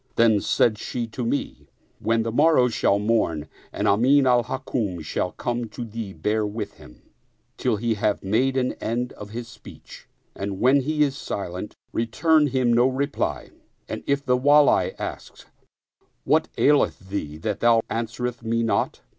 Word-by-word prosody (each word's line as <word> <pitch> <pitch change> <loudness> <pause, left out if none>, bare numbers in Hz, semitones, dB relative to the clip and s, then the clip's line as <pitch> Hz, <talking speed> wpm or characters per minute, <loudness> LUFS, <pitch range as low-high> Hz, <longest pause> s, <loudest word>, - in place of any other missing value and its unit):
Then 110 -3 +4
said 110 +1 +2
she 120 -1 -3
to 120 +3 -5
me, 120 +5 -3 0.2
" - - -39
When 115 0 +1
the 115 - -2
mor 155 +7 +4
row 125 -1 +4
shall 110 -3 +2
morn 100 -8 0 0.2
and - - -2
Amin 130 +7 +4
al 125 -2 +4
Hukm 115 -9 -3
shall 90 +3 -2
come 120 0 -3
to 120 +2 -6
thee 110 -2 -6
bear 105 +6 -1
with 105 0 -5
him - - -16 0.5
till - - 0
he 115 +2 0
have 105 -1 -1
made 130 +7 +1
an 125 -1 0
end 120 +2 -2
of 105 - -10
his 115 +2 -6
speech, 120 -2 -14 0.3
and 100 -1 -5
when 130 +3 +5
he 150 +2 +1
is 140 -2 0
silent, 95 -6 -5 0.2
return 150 +7 +2
him 130 -3 +1
no 120 +2 +4
reply; 135 +2 -2 0.4
and - - -6
if 140 0 0
the 125 - +3
Wali 145 +3 +4
ask: - - -7 0.8
What - - +2
aileth 140 -8 +2
thee 75 -7 -4
that 100 +5 -3
thou 115 -1 +4
answerest 115 +1 -3
me 115 0 0
not? 115 - 0
115 Hz, 170 wpm, -24 LUFS, 105-130 Hz, 0.8 s, when